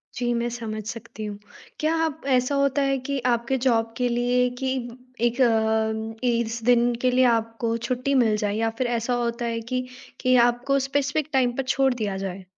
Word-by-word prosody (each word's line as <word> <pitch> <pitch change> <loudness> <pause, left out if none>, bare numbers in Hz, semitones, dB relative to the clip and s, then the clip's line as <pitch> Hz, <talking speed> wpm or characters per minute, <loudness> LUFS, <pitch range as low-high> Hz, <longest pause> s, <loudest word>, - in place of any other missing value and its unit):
जी, 240 -1 0
मैं 235 0 0
समझ 220 -2 -5
सकती 230 -2 -7
हूँ। 205 -1 -5 0.4
क्या 315 +2 +1
आप 315 -3 -2
ऐसा 255 +3 +1
होता 280 0 +2
है 275 0 +1
कि 280 -1 0
आपके 235 +3 0
जॉब 225 -2 +2
के 250 -1 +1
लिए 245 +1 +2
कि 265 - 0 0.6
1 240 +3 -2
अ 220 0 +1
इस 235 -1 0
दिन 240 0 +4
के 255 -1 +3
लिए 255 +1 +4
आपको 230 0 -1
छुट्टी 255 +2 -1
मिल 215 -2 +2
जाए 205 0 -1
या 225 0 +1
फिर 255 - 0
ऐसा 235 +2 -1
होता 235 0 -2
है 230 0 -2
कि 255 0 +1 0.4
कि 255 0 +3
आपको 260 +3 0
स्पेसिफ़िक 285 +2 0
टाइम 250 -2 +3
पर 270 - 0
छोड़ 270 -1 +3
दिया 205 -5 -3
जाए? 190 -1 -5
240 Hz, 190 wpm, -24 LUFS, 225-255 Hz, 0.6 s, दिन